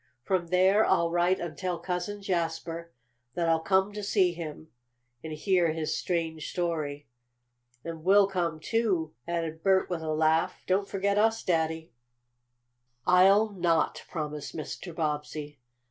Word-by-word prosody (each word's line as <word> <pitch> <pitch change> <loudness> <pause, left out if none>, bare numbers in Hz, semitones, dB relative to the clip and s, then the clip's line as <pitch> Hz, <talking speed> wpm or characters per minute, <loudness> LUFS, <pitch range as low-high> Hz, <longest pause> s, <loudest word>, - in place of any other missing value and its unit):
"From 185 0 0
there 190 +4 +4
I'll 170 -4 +2
write 175 +2 +2
and 170 -3 -5
tell 180 +3 -2
Cousin 185 +4 -4
Jasper 170 -2 -2 0.4
that 170 -1 0
I'll 165 0 +3
come 190 +4 +2
to 210 - -5
see 195 -3 +2
him, 160 -2 -7 0.5
and 160 - -6
hear 170 0 +2
his 160 -1 -2
strange 165 -3 -2
story." 155 -5 -2 0.8
"And 165 -1 -7
we'll 200 +3 +6
come 175 -5 -2
too," 185 -5 0
added 165 -2 -3
Bert 190 0 +2
with 170 -2 -2
a 160 - -4
laugh. 160 +1 +1
"Don't 195 +2 +1
forget 200 +1 +1
us, 225 +1 +2
Daddy." 160 -2 -1 1.1
"I'll 195 +4 +5
not," 170 -5 0
promised 150 -3 -5
Mr. 165 +2 -6
Bobbsey. 150 -2 -3
170 Hz, 140 wpm, -28 LUFS, 160-190 Hz, 1.1 s, we'll